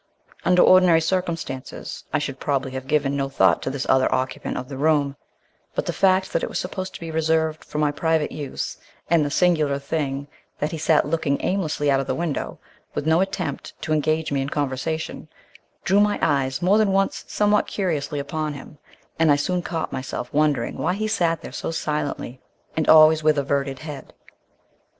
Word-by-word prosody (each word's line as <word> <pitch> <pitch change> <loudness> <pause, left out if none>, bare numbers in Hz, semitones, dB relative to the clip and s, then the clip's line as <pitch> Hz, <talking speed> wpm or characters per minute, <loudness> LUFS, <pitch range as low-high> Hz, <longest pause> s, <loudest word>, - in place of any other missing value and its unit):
Under 180 0 +5
ordinary 180 -3 +6
circumstances 165 -6 -3
I - - +2
should 135 -1 -4
probably 135 -2 -1
have 130 0 -6
given 140 -2 +1
no 135 -1 -1
thought 95 -10 +3
to - - -2
this 135 -1 -3
other 130 0 +3
occupant 130 0 -2
of 125 - -5
the 135 - -7
room; 145 -1 +2 0.6
but - - -1
the - - -2
fact 190 0 +2
that 165 - +1
it - - -2
was - - -3
supposed 185 +1 -4
to - - -7
be 165 -1 -6
reserved 160 0 0
for - - -7
my 150 -1 +2
private 160 0 0
use, 145 -3 -5 0.3
and 165 -3 +5
the 145 - -1
singular 155 -4 +2
thing 140 -1 -3 0.3
that 150 - -2
he 165 - -4
sat 160 0 +3
looking 150 -3 0
aimlessly 155 -6 0
out 135 - +3
of 135 - -3
the 130 - -1
window, 165 -4 -3 0.4
with - - -2
no 160 +2 +4
attempt 180 -7 -4
to 155 - 0
engage 155 +1 0
me 140 -1 +1
in 135 - -3
conversation, 150 +3 -3 0.6
drew 195 +2 +3
my 210 0 +3
eyes 135 0 0
more 200 +4 +4
than 210 -2 +3
once 195 0 +1
somewhat 210 0 +2
curiously 160 -6 -2
upon 150 +1 -3
him, 145 +2 -11 0.4
and 160 -2 +5
I - - +6
soon 175 +5 -1
caught 165 -2 -4
myself 125 -1 -5
wondering 145 -5 +1
why 180 - 0
he 215 +2 -2
sat 170 -7 0
there - - -7
so - - -4
silently, 150 -5 -3 0.3
and 160 - 0
always 155 0 +7
with 155 -1 +3
averted 140 -1 -1
head. 145 -4 -8
155 Hz, 190 wpm, -23 LUFS, 140-165 Hz, 0.6 s, always